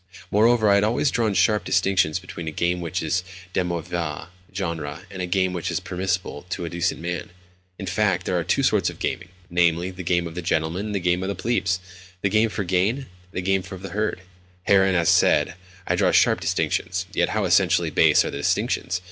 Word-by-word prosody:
Moreover, 110 Hz, +1 st, +4 dB
I 100 Hz, -, +6 dB
had 100 Hz, 0 st, +4 dB
always 120 Hz, +6 st, +1 dB
drawn 110 Hz, -4 st, 0 dB
sharp 95 Hz, +2 st, +3 dB
distinctions 95 Hz, -3 st, +2 dB
between 90 Hz, -2 st, -8 dB
a -, -, -2 dB
game 90 Hz, +3 st, 0 dB
which 85 Hz, +1 st, -3 dB
is 90 Hz, +3 st, 0 dB, 0.3 s
de 95 Hz, -, +1 dB
mauvais 85 Hz, -2 st, -4 dB, 0.2 s
genre 85 Hz, -5 st, -4 dB
and 95 Hz, -1 st, -6 dB
a 90 Hz, -, -2 dB
game 95 Hz, 0 st, +1 dB
which 85 Hz, -2 st, -3 dB
is -, -, -1 dB
permissible 90 Hz, -3 st, -3 dB
to 90 Hz, -, -3 dB
a 85 Hz, -, -5 dB
decent 85 Hz, -1 st, -1 dB
man. 85 Hz, +1 st, -4 dB, 0.5 s
In 95 Hz, -, -6 dB
fact, 95 Hz, -2 st, 0 dB
there 90 Hz, -, -1 dB
are 85 Hz, -, +1 dB
two -, -, +1 dB
sorts -, -, +3 dB
of -, -, -10 dB
gaming—namely, 90 Hz, -1 st, -1 dB
the 90 Hz, 0 st, -8 dB
game 85 Hz, 0 st, +1 dB
of 85 Hz, -, -6 dB
the 90 Hz, -, -4 dB
gentleman 85 Hz, +4 st, -1 dB
and 105 Hz, -, -3 dB
the -, -, +1 dB
game 90 Hz, 0 st, +1 dB
of 95 Hz, -, -2 dB
the 100 Hz, -, -2 dB
plebs—the 90 Hz, -3 st, -2 dB
game 110 Hz, +3 st, +3 dB
for 105 Hz, -, -3 dB
gain, 95 Hz, +6 st, +1 dB
and 135 Hz, -2 st, -8 dB, 0.2 s
the 90 Hz, -, -4 dB
game 95 Hz, +1 st, +2 dB
of 95 Hz, 0 st, -8 dB
the 95 Hz, -, -5 dB
herd. 105 Hz, -2 st, -2 dB, 0.4 s
Herein, 95 Hz, -1 st, +4 dB
as 85 Hz, -2 st, +2 dB
said, -, -, +4 dB, 0.3 s
I -, -, +1 dB
draw -, -, +3 dB
sharp -, -, +4 dB
distinctions. 90 Hz, 0 st, -1 dB
Yet -, -, +1 dB
how -, -, 0 dB
essentially -, -, +3 dB
base -, -, +5 dB
are -, -, -3 dB
the -, -, -5 dB
distinctions! 85 Hz, +4 st, 0 dB
90 Hz, 210 wpm, -23 LUFS, 85-95 Hz, 0.5 s, I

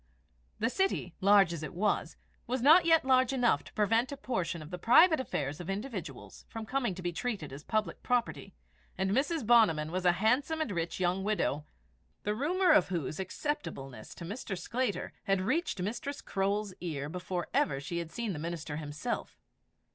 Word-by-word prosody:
The 230 Hz, +3 st, 0 dB
city, 380 Hz, -, 0 dB
large 195 Hz, -3 st, +5 dB
as 165 Hz, -, -5 dB
it 155 Hz, +3 st, -6 dB
was, 205 Hz, +3 st, 0 dB, 0.3 s
was 250 Hz, 0 st, -1 dB
yet 320 Hz, +6 st, +8 dB, 0.2 s
not -, -, -16 dB
large 260 Hz, -1 st, +4 dB
enough 245 Hz, -3 st, +2 dB
to -, -, -14 dB
prevent 225 Hz, +5 st, +2 dB
a 280 Hz, -, -5 dB
portion 185 Hz, -, -2 dB
of 155 Hz, -, -12 dB
the 180 Hz, -, -5 dB
private 315 Hz, -, +6 dB
affairs 145 Hz, -, -3 dB
of 175 Hz, -, -7 dB
individuals 190 Hz, -, -6 dB
from 225 Hz, -1 st, -6 dB
coming 245 Hz, -5 st, -1 dB
to 185 Hz, -, -8 dB
be 175 Hz, 0 st, -2 dB
treated 195 Hz, -, -3 dB
as 140 Hz, +2 st, -9 dB
public 215 Hz, +4 st, -1 dB
property, 245 Hz, -2 st, -1 dB, 0.4 s
and 190 Hz, 0 st, 0 dB
Mrs. 285 Hz, -, +1 dB
Bonniman 185 Hz, -10 st, +4 dB
was 185 Hz, +1 st, -2 dB
a 175 Hz, -1 st, +5 dB
handsome 255 Hz, -, +1 dB
and 310 Hz, -8 st, -1 dB
rich 170 Hz, -2 st, -3 dB
young 185 Hz, +1 st, +1 dB
widow, 195 Hz, -8 st, 0 dB, 0.6 s
the 210 Hz, -, 0 dB
rumour 350 Hz, -, +2 dB
of 305 Hz, -, +5 dB
whose 165 Hz, -4 st, -3 dB
acceptableness 185 Hz, -, -5 dB
to 170 Hz, -, -8 dB
Mr. 200 Hz, 0 st, -5 dB
Sclater 235 Hz, +4 st, -2 dB
had 195 Hz, -1 st, +2 dB
reached 300 Hz, -, 0 dB
Mistress 235 Hz, +9 st, -3 dB
Croale's 200 Hz, +1 st, -1 dB
ear 150 Hz, -5 st, -3 dB
before 180 Hz, +2 st, -4 dB
ever 135 Hz, -1 st, +2 dB
she 170 Hz, +5 st, -4 dB
had 165 Hz, -1 st, -6 dB
seen 230 Hz, -4 st, -3 dB
the 155 Hz, -, -5 dB
minister 160 Hz, -2 st, -4 dB
himself. 155 Hz, +10 st, -4 dB
195 Hz, 180 wpm, -31 LUFS, 170-245 Hz, 0.6 s, yet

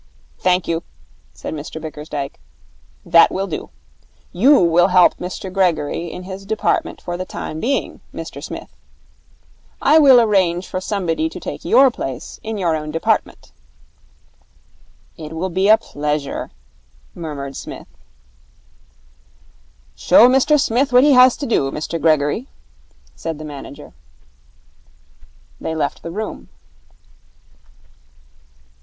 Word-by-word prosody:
'Thank 180 Hz, 0 st, +1 dB
you,' 165 Hz, 0 st, -1 dB, 0.5 s
said -, -, -7 dB
Mr 155 Hz, +1 st, -7 dB
Bickersdyke. 150 Hz, -2 st, -6 dB, 0.7 s
'That 170 Hz, -1 st, +6 dB
will 195 Hz, +1 st, -2 dB
do. 180 Hz, -, -6 dB, 0.6 s
You 265 Hz, +11 st, +5 dB
will 175 Hz, 0 st, +4 dB
help 180 Hz, -1 st, +5 dB
Mr 185 Hz, +1 st, -6 dB
Gregory 170 Hz, -3 st, 0 dB
in 180 Hz, -, -8 dB
his 190 Hz, +1 st, -8 dB
department 215 Hz, +2 st, -1 dB
for 175 Hz, -1 st, -5 dB
the 185 Hz, -, -3 dB
time 155 Hz, -3 st, -6 dB
being, 270 Hz, +10 st, -2 dB
Mr -, -, -8 dB
Smith. -, -, -8 dB, 1.0 s
I 315 Hz, -, +5 dB
will 270 Hz, -5 st, +7 dB
arrange 190 Hz, -5 st, +2 dB
for 185 Hz, -, -4 dB
somebody 200 Hz, -, -1 dB
to -, -, -9 dB
take -, -, -7 dB
your 270 Hz, -1 st, +5 dB
place 135 Hz, -, -6 dB
in 220 Hz, 0 st, -5 dB
your 170 Hz, -5 st, 0 dB
own 155 Hz, -1 st, -5 dB
department.' 165 Hz, +2 st, -1 dB, 1.7 s
'It 155 Hz, 0 st, -8 dB
will 180 Hz, +3 st, -3 dB
be 190 Hz, +3 st, +1 dB
a 220 Hz, -, +8 dB
pleasure,' 150 Hz, -4 st, -4 dB, 0.6 s
murmured 140 Hz, -4 st, -6 dB
Psmith. -, -, -8 dB, 2.1 s
'Show 235 Hz, -, +6 dB
Mr 270 Hz, +4 st, +3 dB
Smith 260 Hz, +2 st, +1 dB
what 250 Hz, +1 st, +6 dB
he 295 Hz, -, +5 dB
has 255 Hz, -1 st, +6 dB
to 285 Hz, -, -4 dB
do, 140 Hz, -, +1 dB
Mr 155 Hz, +3 st, -4 dB
Gregory,' 155 Hz, -, +1 dB, 0.7 s
said 165 Hz, -2 st, -5 dB
the 155 Hz, -, -8 dB
manager. 145 Hz, -2 st, -10 dB, 1.7 s
They 160 Hz, -, -4 dB
left 155 Hz, -, -2 dB
the -, -, -7 dB
room. 210 Hz, +5 st, -6 dB
180 Hz, 125 wpm, -19 LUFS, 155-220 Hz, 2.1 s, a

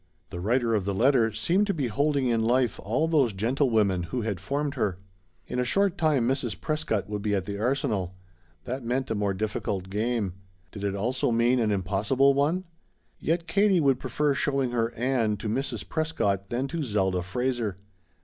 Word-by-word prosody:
The 85 Hz, -, -5 dB
writer 115 Hz, +4 st, +1 dB
of 105 Hz, -3 st, +1 dB
the 100 Hz, -1 st, -1 dB
letter 120 Hz, 0 st, +3 dB
seemed 185 Hz, -, +1 dB
to 200 Hz, -, 0 dB
be 145 Hz, -5 st, -1 dB
holding 140 Hz, +4 st, +1 dB
in 115 Hz, -2 st, +2 dB
life 120 Hz, 0 st, +1 dB
all 125 Hz, +11 st, 0 dB
those 140 Hz, -9 st, +3 dB
gentlewomen 110 Hz, -3 st, +1 dB
who 125 Hz, -, -2 dB
had 105 Hz, -5 st, -2 dB
formed 140 Hz, +8 st, -2 dB
her. 105 Hz, -9 st, -1 dB, 0.5 s
In 125 Hz, -, -3 dB
a -, -, +2 dB
short 195 Hz, +8 st, +2 dB
time 150 Hz, -9 st, +2 dB
Mrs. 125 Hz, -9 st, -1 dB
Prescott 115 Hz, -, -1 dB
would 105 Hz, 0 st, -4 dB
be 105 Hz, 0 st, 0 dB
at 95 Hz, -2 st, -1 dB
the 100 Hz, 0 st, -5 dB
Arsenal. 110 Hz, -7 st, -1 dB, 0.5 s
That 130 Hz, +1 st, -4 dB
meant 125 Hz, +1 st, -1 dB
a -, -, +3 dB
more 100 Hz, -2 st, 0 dB
difficult 95 Hz, -2 st, -3 dB
game. 110 Hz, -2 st, -1 dB, 0.4 s
Did 100 Hz, -, -8 dB
it 100 Hz, -1 st, -1 dB
also 125 Hz, +7 st, 0 dB
mean 120 Hz, +2 st, +3 dB
an 110 Hz, -2 st, +2 dB
impossible 105 Hz, +8 st, +2 dB
one? 150 Hz, +7 st, +1 dB, 0.6 s
Yet 165 Hz, +1 st, 0 dB
Katie 195 Hz, +2 st, +3 dB
would 135 Hz, -4 st, +3 dB
prefer 150 Hz, -1 st, 0 dB
showing 135 Hz, -3 st, 0 dB
her 115 Hz, -1 st, 0 dB
Ann 115 Hz, -4 st, +1 dB
to 110 Hz, -, -5 dB
Mrs. 120 Hz, 0 st, -2 dB
Prescott 100 Hz, -, -1 dB
than 125 Hz, +3 st, -1 dB
to 165 Hz, +1 st, -3 dB
Zelda 95 Hz, -8 st, 0 dB
Fraser. 115 Hz, +1 st, -2 dB
120 Hz, 185 wpm, -27 LUFS, 105-140 Hz, 0.6 s, letter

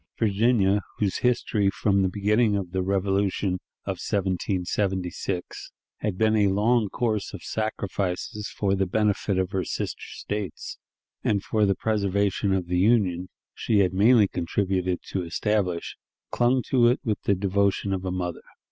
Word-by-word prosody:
Virginia, 105 Hz, -2 st, +2 dB, 0.2 s
whose 100 Hz, -3 st, 0 dB
history, 110 Hz, -5 st, +1 dB
from 100 Hz, 0 st, +1 dB
the 95 Hz, -, +2 dB
beginning 105 Hz, +3 st, +2 dB
of 95 Hz, -3 st, -3 dB
the 95 Hz, 0 st, -1 dB
Revolution 95 Hz, 0 st, 0 dB, 0.3 s
of -, -, -3 dB
1776, 95 Hz, -1 st, -2 dB, 0.3 s
had 100 Hz, -4 st, -3 dB
been 110 Hz, +1 st, +3 dB
a 105 Hz, -2 st, +4 dB
long 105 Hz, +3 st, +2 dB
course 110 Hz, -4 st, -2 dB
of -, -, -10 dB
sacrifices 105 Hz, -1 st, -3 dB
for 100 Hz, -2 st, -1 dB
the 95 Hz, -1 st, +1 dB
benefit 105 Hz, 0 st, +1 dB
of 95 Hz, 0 st, 0 dB
her 95 Hz, -1 st, -1 dB
sister -, -, -4 dB
States, 105 Hz, -2 st, -6 dB, 0.4 s
and 100 Hz, -2 st, +1 dB
for 105 Hz, -2 st, +1 dB
the 100 Hz, -, +2 dB
preservation 100 Hz, -1 st, 0 dB
of 95 Hz, -2 st, 0 dB
the 90 Hz, +1 st, 0 dB
Union 95 Hz, -4 st, +2 dB, 0.2 s
she 105 Hz, -3 st, +2 dB
had 95 Hz, -1 st, +1 dB
mainly 105 Hz, +2 st, +5 dB
contributed 90 Hz, 0 st, -1 dB
to 95 Hz, -, -3 dB
establish, 90 Hz, 0 st, -1 dB, 0.3 s
clung 125 Hz, +1 st, +2 dB
to 120 Hz, -3 st, +4 dB
it 125 Hz, +3 st, +3 dB
with 110 Hz, -6 st, -1 dB
the 100 Hz, -, +3 dB
devotion 100 Hz, +1 st, +1 dB
of 95 Hz, -1 st, -3 dB
a 95 Hz, -, -2 dB
mother. 90 Hz, -2 st, -3 dB
100 Hz, 150 wpm, -25 LUFS, 95-105 Hz, 0.4 s, mainly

